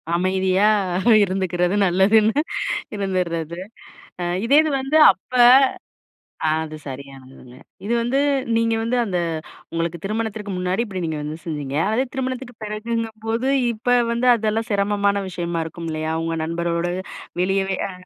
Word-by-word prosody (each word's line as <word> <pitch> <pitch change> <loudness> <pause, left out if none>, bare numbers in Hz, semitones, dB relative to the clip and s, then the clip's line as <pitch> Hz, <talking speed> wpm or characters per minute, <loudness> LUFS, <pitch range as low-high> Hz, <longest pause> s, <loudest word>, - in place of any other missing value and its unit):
அமைதியா 190 +3 +2 0.5
இருந்துக்கிறது 185 -1 0
நல்லதுன்னு 210 +8 +3 0.6
இருந்துர்றது 175 -4 -2 0.6
அ - - -1 0.2
இதே 275 +5 +4
இது 310 - -1
வந்து 270 +4 0 0.2
அப்ப 195 - -30 1.2
ஆ - - +3 0.2
அது 155 0 -8
சரியானதுங்க. 135 -2 -10 0.3
இது 235 - 0
வந்து 250 +4 0 0.4
நீங்க 230 0 +2
வந்து 235 +2 0
அந்த 185 -3 -2 0.5
உங்களுக்கு 165 +1 -2
திருமணத்திற்கு 215 -1 -3
முன்னாடி 185 +5 0
இப்பிடி 190 -5 -5
நீங்க 160 -1 -3
வந்து 150 +2 -5
செஞ்சிங்க. 145 -4 -4 0.2
அதே 250 +4 +2
திருமணத்துக்கு 260 -2 -4
பிறகுங்கம்போது, 225 +2 -3 0.2
இப்ப 245 +2 +1 0.2
வந்து 240 +2 0
அதெல்லாம் 220 +1 -1
சிரமமான 200 0 +1
விஷயமா 170 -2 -3
இருக்கும் 165 +1 -7
இல்லயா! 155 0 -2
உங்க 165 0 -2
நண்பரோடு 170 +1 -1 0.5
வெளியவே 190 0 0
அ - - -6
195 Hz, 125 wpm, -21 LUFS, 170-225 Hz, 1.2 s, இதே